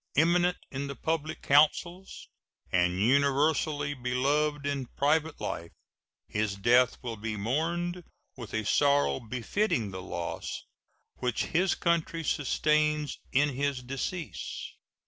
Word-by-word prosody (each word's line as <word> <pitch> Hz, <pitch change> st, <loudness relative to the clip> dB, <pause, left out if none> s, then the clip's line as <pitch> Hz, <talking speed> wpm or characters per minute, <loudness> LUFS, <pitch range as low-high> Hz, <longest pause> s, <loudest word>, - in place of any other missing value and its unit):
Eminent 175 Hz, +3 st, +4 dB
in 140 Hz, +1 st, -3 dB
the 140 Hz, -, -5 dB
public 160 Hz, -1 st, -2 dB
councils 170 Hz, +6 st, +2 dB, 0.4 s
and 90 Hz, 0 st, +2 dB
universally 140 Hz, +4 st, +2 dB
beloved 140 Hz, +3 st, 0 dB
in 140 Hz, -3 st, -2 dB
private 155 Hz, +2 st, +1 dB
life, 85 Hz, -, -4 dB, 0.6 s
his 105 Hz, -2 st, -1 dB
death 120 Hz, +5 st, +4 dB
will 115 Hz, -2 st, -4 dB
be 110 Hz, +1 st, -4 dB
mourned 170 Hz, -, -1 dB, 0.3 s
with 120 Hz, -5 st, -9 dB
a 110 Hz, -1 st, -2 dB
sorrow 145 Hz, +4 st, +3 dB
befitting 120 Hz, -, -1 dB
the 95 Hz, 0 st, -6 dB
loss 85 Hz, -1 st, -5 dB, 0.5 s
which 125 Hz, -2 st, -1 dB
his 180 Hz, +2 st, +3 dB
country 170 Hz, -1 st, 0 dB
sustains 150 Hz, 0 st, +1 dB
in 145 Hz, +3 st, +3 dB
his 140 Hz, -1 st, -2 dB
decease. 135 Hz, +6 st, -5 dB
140 Hz, 115 wpm, -29 LUFS, 125-155 Hz, 0.6 s, Eminent